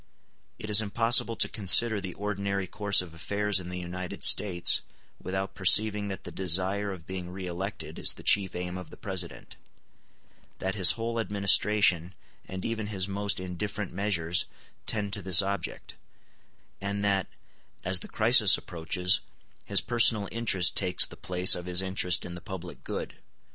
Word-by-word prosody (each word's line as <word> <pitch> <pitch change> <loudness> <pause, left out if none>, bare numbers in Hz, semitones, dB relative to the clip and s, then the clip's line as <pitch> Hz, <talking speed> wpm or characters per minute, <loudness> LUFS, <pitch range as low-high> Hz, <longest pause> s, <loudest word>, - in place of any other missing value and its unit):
It 105 - -8
is 105 +1 +6
impossible 115 +2 +1
to - - +1
consider 110 +1 +4
the 95 -2 -8
ordinary 100 -1 -4
course 100 0 +1
of 85 -3 -13
affairs 100 +4 -1
in 90 -1 -9
the 90 - -6
United 90 0 -7
States 90 -4 +4 0.4
without 95 +1 -5
perceiving 105 +2 +3
that 95 -1 -7
the - - -9
desire 95 +3 +1
of 90 -4 -10
being 95 -2 -7
re 95 +1 -8
elected 95 +3 -7
is - - +1
the - - -15
chief 95 -2 +3
aim 90 +1 -5
of 90 - -11
the - - -14
President; 95 -4 -2 1.0
that 95 0 -4
his 95 -3 +6
whole 115 0 -4
administration, 100 -4 +2 0.3
and 95 0 -7
even 110 -2 -4
his 95 -3 0
most 100 0 -2
indifferent 95 +2 -6
measures, 90 -3 0 0.4
tend 105 -2 -2
to 100 - -4
this 95 0 +5
object; 100 +1 -6 0.9
and 100 +1 -4
that, 95 -2 0 0.6
as 95 0 0
the - - -8
crisis 110 -4 +4
approaches, 90 +2 -1 0.4
his - - +1
personal 115 -3 +2
interest 100 -6 +2
takes 90 -2 +3
the - - -12
place 90 0 +3
of 90 0 -5
his 90 0 +4
interest 95 -1 0
in 85 - -8
the 90 - -9
public 90 -1 -9
good. - - -7
95 Hz, 160 wpm, -27 LUFS, 90-105 Hz, 1.0 s, is